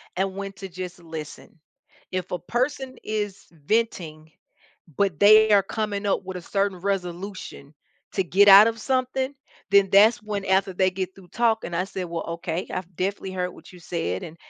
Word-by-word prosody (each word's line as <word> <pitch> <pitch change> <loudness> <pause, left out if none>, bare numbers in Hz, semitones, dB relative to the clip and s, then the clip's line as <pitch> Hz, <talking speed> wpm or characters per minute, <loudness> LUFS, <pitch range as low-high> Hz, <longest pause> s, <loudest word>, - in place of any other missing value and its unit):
and 190 +1 -1
when 195 0 -5
to 195 0 -8
just 180 0 -7
listen. 160 -1 -9 0.5
If 185 -1 -4
a 180 - -2
person 255 - -2
is 210 -2 -4
venting, 160 -2 -2 0.7
but 195 -7 +1
they 215 +1 +7
are 200 -1 +6
coming 210 -1 -3
up 195 - 0
with 190 -1 -5
a - - -7
certain 195 0 -1
resolution 185 -5 -5 0.4
to 190 - +1
get 195 +3 +4
out 200 +1 +10
of 230 0 -2
something, 260 +1 -1 0.4
then 200 -1 +5
that's 215 +4 +5
when 205 -2 -3
after 190 0 +2
they 185 +1 +2
get 185 0 -4
through 190 -2 -15
talking, 225 -4 0
I 180 - +1
said, 190 -1 -5
"Well, 170 -1 -5
okay. 170 +1 -3
I've 185 -1 -6
definitely 190 +1 -3
heard 180 -1 -2
what - - -15
you 180 - -14
said, 130 - -3
and 160 - -9
195 Hz, 180 wpm, -24 LUFS, 180-205 Hz, 0.7 s, out